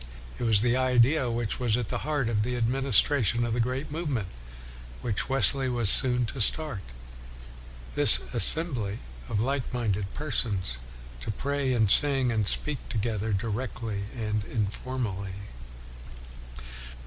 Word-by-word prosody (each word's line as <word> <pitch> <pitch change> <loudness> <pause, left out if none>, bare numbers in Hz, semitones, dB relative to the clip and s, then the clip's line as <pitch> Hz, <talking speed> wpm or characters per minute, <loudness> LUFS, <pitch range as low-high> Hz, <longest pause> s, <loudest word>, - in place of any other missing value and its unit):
It 120 - -3
was 110 -2 +2
the 120 0 +1
idea 130 +1 +2
which 115 -1 -3
was 120 -3 0
at 120 -4 -5
the - - -3
heart 145 -5 -2
of 110 -2 -1
the 125 +3 -3
administration 120 -1 +2
of 115 - -3
the 120 - -2
great 130 +5 -3
movement 145 - -4 0.7
which 110 +3 -3
Wesley 135 0 +1
was 120 -4 0
3o6 - - +7
WESLEY - - +4 0.2
soon 125 - 0
to 120 +2 -6
start 150 -1 +1 1.1
this - - +10 0.2
assembly 125 - +4 0.3
of 105 - -2
like 135 +3 -3
minded 105 -6 -3
persons 105 - -3 0.4
to - - -8
pray 140 +4 -2
and 110 -5 +1
sing 135 -4 +2
and 110 -3 -1
speak 150 +5 0
to 120 - -4
gether 110 0 -3
directly 110 0 -4
and 105 -2 -3
informally. 105 -2 -5
120 Hz, 145 wpm, -26 LUFS, 105-130 Hz, 1.1 s, this